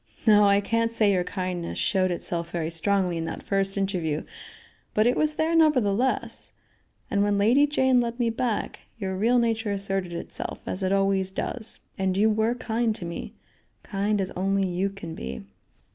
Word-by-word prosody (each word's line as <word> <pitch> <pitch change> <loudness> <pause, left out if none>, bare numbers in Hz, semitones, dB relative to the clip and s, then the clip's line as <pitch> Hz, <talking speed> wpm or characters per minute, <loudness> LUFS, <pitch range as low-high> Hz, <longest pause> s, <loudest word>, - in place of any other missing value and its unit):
"No, 210 -1 +6
I 200 0 +4
can't 230 +2 0
say 215 -3 +3
your 180 -2 +1
kindness 180 -2 -4
showed 190 -4 +1
itself 170 -1 -3
very 165 -1 -3
strongly 180 +1 +1
in 165 - -2
that - - -6
first 195 0 0
interview, 175 -6 -1 0.7
but 215 - +4
it 245 - +3
was 305 0 +1
there 315 +2 +1
nevertheless, 255 -5 +2 0.6
and 200 - +2
when 205 0 +2
Lady 245 +8 +4
Jane 260 -3 +3
led 235 +1 -3
me 235 -1 +2
back, 230 -1 -2 0.2
your 190 -3 -3
real 230 +6 +3
nature 225 -2 +1
asserted 195 -2 -2
itself, 170 - -5
as 185 - -3
it 190 0 0
always 195 -1 +2
does, 220 +3 -4 0.2
and 190 -1 0
you 215 +2 +4
were 220 +3 +1
kind 230 -2 -1
to 175 - -4
me; 170 0 -6 0.5
kind 205 0 -1
as 190 -1 -2
only 195 +1 0
you 185 +2 -1
can 195 -4 -8
be." 65 - -6
200 Hz, 175 wpm, -26 LUFS, 185-230 Hz, 0.7 s, No